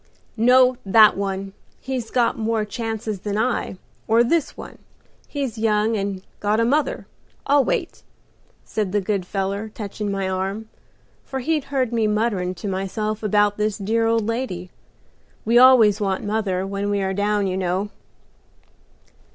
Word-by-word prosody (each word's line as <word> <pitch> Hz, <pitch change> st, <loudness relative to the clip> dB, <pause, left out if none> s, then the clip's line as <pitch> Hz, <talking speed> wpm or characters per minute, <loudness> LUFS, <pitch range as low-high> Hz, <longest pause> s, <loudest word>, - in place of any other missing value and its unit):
"'No, 250 Hz, +2 st, +5 dB
that 215 Hz, +2 st, +6 dB
one. 195 Hz, 0 st, -3 dB, 0.3 s
He's 255 Hz, -4 st, -4 dB
got 240 Hz, -2 st, +1 dB
more 225 Hz, -1 st, -1 dB
chances 220 Hz, -1 st, -4 dB
than 205 Hz, +1 st, -3 dB
I, 230 Hz, -4 st, -1 dB, 0.3 s
or 230 Hz, +2 st, +4 dB
this 315 Hz, +5 st, 0 dB
one; -, -, -10 dB, 0.5 s
he's 270 Hz, -6 st, -4 dB
young 215 Hz, 0 st, +2 dB
and 195 Hz, -2 st, -3 dB, 0.2 s
got 210 Hz, +1 st, +1 dB
a 230 Hz, -, +3 dB
mother; 290 Hz, +5 st, 0 dB, 0.4 s
I'll 280 Hz, 0 st, +4 dB
wait,' -, -, -2 dB, 0.6 s
said 205 Hz, -3 st, -3 dB
the 205 Hz, -, +3 dB
good 195 Hz, -2 st, -2 dB
feller, 200 Hz, +3 st, -3 dB
touchin' 210 Hz, -1 st, -5 dB
my 195 Hz, -1 st, -2 dB
arm, 190 Hz, +4 st, -3 dB, 0.6 s
for 265 Hz, -, -6 dB
he 310 Hz, +5 st, 0 dB
'd 275 Hz, -, -13 dB
heard 260 Hz, -4 st, -1 dB
me 225 Hz, -2 st, +2 dB
mutterin' 210 Hz, -4 st, 0 dB
to 205 Hz, -, -6 dB
myself 200 Hz, +3 st, -3 dB
about 205 Hz, -1 st, +2 dB
this 210 Hz, -1 st, -1 dB
dear 225 Hz, +2 st, 0 dB
old 225 Hz, -1 st, +1 dB
lady. 220 Hz, -6 st, -3 dB, 0.7 s
We 235 Hz, +2 st, +5 dB
always 235 Hz, -5 st, +6 dB
want 195 Hz, -2 st, -1 dB
mother 205 Hz, -3 st, -1 dB
when 200 Hz, +1 st, -3 dB
we 200 Hz, -1 st, 0 dB
are 190 Hz, 0 st, -1 dB
down, 205 Hz, +1 st, 0 dB
you 185 Hz, -1 st, -1 dB
know." 190 Hz, +2 st, -1 dB
210 Hz, 155 wpm, -22 LUFS, 195-230 Hz, 0.7 s, that